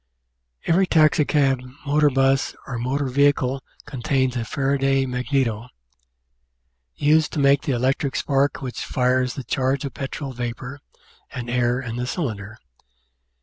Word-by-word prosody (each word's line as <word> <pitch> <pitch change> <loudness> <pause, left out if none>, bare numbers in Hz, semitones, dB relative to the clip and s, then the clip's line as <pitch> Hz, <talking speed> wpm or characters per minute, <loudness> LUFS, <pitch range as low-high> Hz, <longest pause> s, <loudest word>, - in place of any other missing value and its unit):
Every 185 +3 +3
taxicab, 150 -5 +3 0.2
motor 145 +1 +3
bus, 135 0 +1
or 125 -3 -5
motor 135 +4 -1
vehicle 135 0 +2 0.2
contains 130 -2 -1
a 120 - -1
Fara 140 +4 -1
duy 135 0 +2
magneto, 125 -3 -1 1.3
used 155 +2 +3
to - - -2
make 140 0 +4
the 140 - -1
electric 130 +3 0
spark 140 0 0
which 125 -2 -4
fires 125 0 +1
the 135 - -5
charge 135 +2 -1
of 135 - -5
petrol 135 0 -5
vapour 125 +3 -5 0.5
and 120 -3 -5
air 120 0 +1
in 120 -2 -5
the 125 0 -2
cylinder. 110 - -4
135 Hz, 135 wpm, -23 LUFS, 125-140 Hz, 1.3 s, make